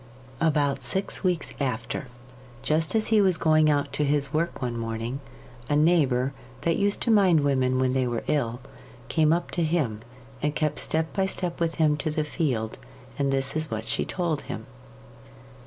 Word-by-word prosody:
About 145 Hz, -4 st, +1 dB
six 190 Hz, +12 st, -2 dB
weeks 180 Hz, -4 st, 0 dB
after 125 Hz, 0 st, -2 dB, 0.6 s
just 160 Hz, +5 st, +1 dB
as 220 Hz, -, +2 dB
he 220 Hz, -2 st, +5 dB
was 185 Hz, -4 st, +3 dB
going 155 Hz, -1 st, +4 dB
out 145 Hz, -1 st, +1 dB
to 150 Hz, -, 0 dB
his 145 Hz, 0 st, 0 dB
work 165 Hz, +2 st, -1 dB
one 120 Hz, -2 st, -2 dB
morning 115 Hz, +3 st, -3 dB, 0.5 s
a 145 Hz, -, +2 dB
neighbour, 145 Hz, -5 st, +3 dB, 0.3 s
that 165 Hz, -1 st, +1 dB
used 200 Hz, 0 st, +1 dB
to 235 Hz, -, +2 dB
mind 190 Hz, -7 st, +5 dB
women 130 Hz, -2 st, +2 dB
when 130 Hz, 0 st, +2 dB
they 130 Hz, -1 st, +1 dB
were 120 Hz, -1 st, -2 dB
ill, 125 Hz, -4 st, -1 dB, 0.5 s
came 155 Hz, -2 st, +3 dB
up 170 Hz, +1 st, 0 dB
to 175 Hz, -, 0 dB
him, 150 Hz, -10 st, 0 dB, 0.4 s
and 150 Hz, 0 st, 0 dB
kept 155 Hz, -1 st, 0 dB
step 160 Hz, 0 st, 0 dB
by 195 Hz, -1 st, +1 dB
step 180 Hz, -2 st, -2 dB
with 165 Hz, -1 st, 0 dB
him 150 Hz, -2 st, +3 dB
to 150 Hz, -, -2 dB
the 155 Hz, 0 st, 0 dB
field, 130 Hz, -, -2 dB, 0.4 s
and 140 Hz, -1 st, +1 dB
this 135 Hz, +1 st, 0 dB
is 155 Hz, 0 st, -1 dB
what 110 Hz, 0 st, -4 dB
she 115 Hz, -, 0 dB
told 170 Hz, -5 st, -2 dB
him. -, -, -6 dB
150 Hz, 180 wpm, -26 LUFS, 130-165 Hz, 0.6 s, he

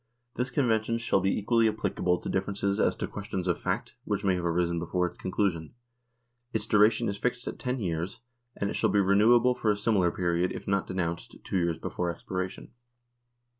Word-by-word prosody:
This 125 Hz, +1 st, -2 dB
convention 115 Hz, -3 st, +1 dB
shall 115 Hz, -4 st, +1 dB
be 95 Hz, +1 st, +1 dB
equally 115 Hz, +1 st, +3 dB
applicable 100 Hz, -4 st, 0 dB
to -, -, -6 dB
differences 100 Hz, +1 st, -1 dB
as -, -, +3 dB
to -, -, -3 dB
questions 100 Hz, -3 st, -4 dB
of 90 Hz, -, +1 dB
fact -, -, -2 dB
which 100 Hz, -1 st, -2 dB
may 95 Hz, -, +4 dB
have 90 Hz, -1 st, -2 dB
arisen 85 Hz, 0 st, +1 dB
before 90 Hz, +2 st, 0 dB
its 90 Hz, 0 st, -5 dB
conclusion. 90 Hz, -2 st, -1 dB, 0.8 s
Its 110 Hz, -, -1 dB
duration 110 Hz, +2 st, +4 dB
is 100 Hz, 0 st, -3 dB
fixed 125 Hz, +1 st, -1 dB
at -, -, -5 dB
ten 125 Hz, 0 st, -2 dB
years, 85 Hz, -2 st, -3 dB, 0.4 s
and 100 Hz, -, -1 dB
it -, -, -3 dB
shall -, -, +1 dB
be 105 Hz, -, +3 dB
renewable 110 Hz, +6 st, +5 dB
for 120 Hz, -3 st, -1 dB
a 105 Hz, -, +2 dB
similar 100 Hz, -4 st, +2 dB
period 85 Hz, 0 st, 0 dB
if -, -, -8 dB
not 100 Hz, -2 st, +1 dB
denounced 85 Hz, -2 st, -3 dB
two -, -, -2 dB
years 85 Hz, -2 st, +1 dB
before 90 Hz, -, -3 dB
expiration. 95 Hz, +2 st, -5 dB
100 Hz, 190 wpm, -28 LUFS, 90-110 Hz, 0.8 s, renewable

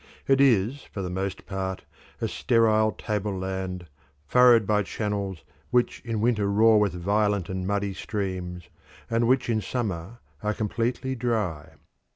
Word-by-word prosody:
It 135 Hz, 0 st, +4 dB
is 125 Hz, +1 st, +3 dB
for 100 Hz, -, -6 dB
the 90 Hz, -, -4 dB
most 95 Hz, +1 st, -3 dB
part 95 Hz, -1 st, -4 dB, 0.4 s
a -, -, +1 dB
sterile 110 Hz, -2 st, +3 dB
tableland 95 Hz, -3 st, -3 dB, 0.4 s
furrowed 120 Hz, -, +6 dB
by 105 Hz, +1 st, +2 dB
channels 100 Hz, -3 st, -3 dB, 0.3 s
which 125 Hz, -1 st, +1 dB
in 115 Hz, -3 st, -2 dB
winter 110 Hz, -3 st, +2 dB
roar 110 Hz, +2 st, +5 dB
with 100 Hz, -4 st, +1 dB
violent 100 Hz, +1 st, 0 dB
and 95 Hz, -1 st, -3 dB
muddy 100 Hz, -1 st, -1 dB
streams, 95 Hz, -3 st, -4 dB, 0.5 s
and 115 Hz, 0 st, +2 dB
which 130 Hz, +1 st, +2 dB
in 110 Hz, -2 st, +1 dB
summer 105 Hz, -3 st, -3 dB, 0.2 s
are 105 Hz, -1 st, -1 dB
completely 120 Hz, +4 st, -1 dB
dry. 110 Hz, -, -2 dB
105 Hz, 140 wpm, -26 LUFS, 95-115 Hz, 0.5 s, furrowed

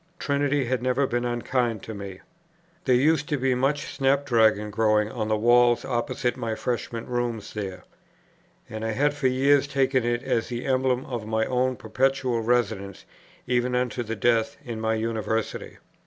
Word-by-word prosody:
Trinity 140 Hz, -2 st, 0 dB
had 125 Hz, 0 st, -1 dB
never 130 Hz, +2 st, +1 dB
been 120 Hz, -1 st, -1 dB
unkind 120 Hz, -2 st, -1 dB
to 110 Hz, -, -6 dB
me. 100 Hz, -2 st, -8 dB, 0.6 s
There 130 Hz, -, +4 dB
used 150 Hz, +4 st, +2 dB
to 150 Hz, -, +1 dB
be 130 Hz, 0 st, +1 dB
much 140 Hz, +3 st, -1 dB
snap 140 Hz, 0 st, +2 dB
dragon 110 Hz, -4 st, +3 dB
growing 105 Hz, 0 st, +2 dB
on 110 Hz, -4 st, -3 dB
the 110 Hz, 0 st, +1 dB
walls 120 Hz, +2 st, +4 dB
opposite 125 Hz, 0 st, -1 dB
my 115 Hz, -3 st, -3 dB
freshman's 115 Hz, -1 st, -3 dB
rooms 120 Hz, -3 st, -3 dB
there, 95 Hz, -3 st, -5 dB, 0.8 s
and 110 Hz, 0 st, -6 dB
I 110 Hz, 0 st, -1 dB
had 145 Hz, +5 st, +2 dB
for 145 Hz, -2 st, 0 dB
years 140 Hz, +2 st, +3 dB
taken 135 Hz, -2 st, +1 dB
it 120 Hz, 0 st, -1 dB
as 115 Hz, -, 0 dB
the 120 Hz, 0 st, -4 dB
emblem 130 Hz, -1 st, +1 dB
of 120 Hz, -5 st, -5 dB
my 110 Hz, 0 st, +1 dB
own 130 Hz, 0 st, 0 dB
perpetual 125 Hz, +1 st, 0 dB
residence 110 Hz, -, -1 dB, 0.4 s
even 125 Hz, 0 st, 0 dB
unto 125 Hz, 0 st, -1 dB
death 115 Hz, +4 st, 0 dB
in 115 Hz, -3 st, -5 dB
my 110 Hz, 0 st, +1 dB
University. 110 Hz, 0 st, -3 dB
120 Hz, 165 wpm, -25 LUFS, 110-130 Hz, 0.8 s, There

